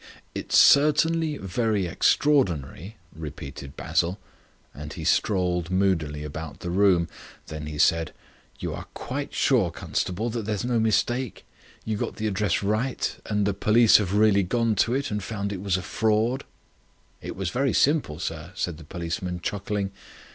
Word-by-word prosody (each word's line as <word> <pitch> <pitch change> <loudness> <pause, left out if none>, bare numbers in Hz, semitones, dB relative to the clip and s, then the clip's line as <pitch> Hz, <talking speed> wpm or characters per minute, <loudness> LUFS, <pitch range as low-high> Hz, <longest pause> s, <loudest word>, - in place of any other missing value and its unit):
"It's - - 0
certainly 155 +2 +5
very 105 0 0
extraordinary," 95 - +1 0.2
repeated 70 -3 -8
Basil. 90 +4 0 0.5
And 75 +1 -8
he - - -7
strolled 90 -4 +1
moodily 85 -6 0
about 75 +1 -7
the 85 - -3
room. 90 -3 +3 0.4
Then 75 -1 -6
he 75 -1 -6
said: 80 +1 +3 0.5
"You - - -3
are - - -7
quite 140 +3 -4
sure, 120 -10 +2
constable, 100 +7 -2
that 115 -2 -3
there's 105 0 -2
no 120 -2 +1
mistake? 120 +3 0 0.4
You 110 -1 -1
got - - -3
the 110 - -4
address 105 -2 0
right, 110 +6 -1
and 105 -1 +1
the 100 - +1
police 110 +3 +5
have 100 -2 -1
really 105 -1 +5
gone 115 +4 +1
to 120 +5 +2
it 140 -2 -2
and 105 0 -1
found 100 0 -3
it 95 - -6
was 95 -2 +1
a 90 - -5
fraud?" 110 +7 0 0.8
"It - - -6
was 95 -3 -3
very 135 +3 +1
simple, 140 - +2
sir," 80 +1 -5
said 85 -3 -2
the - - -10
policeman, 90 +2 -4
chuckling. 100 +1 -2
100 Hz, 155 wpm, -25 LUFS, 85-115 Hz, 0.8 s, certainly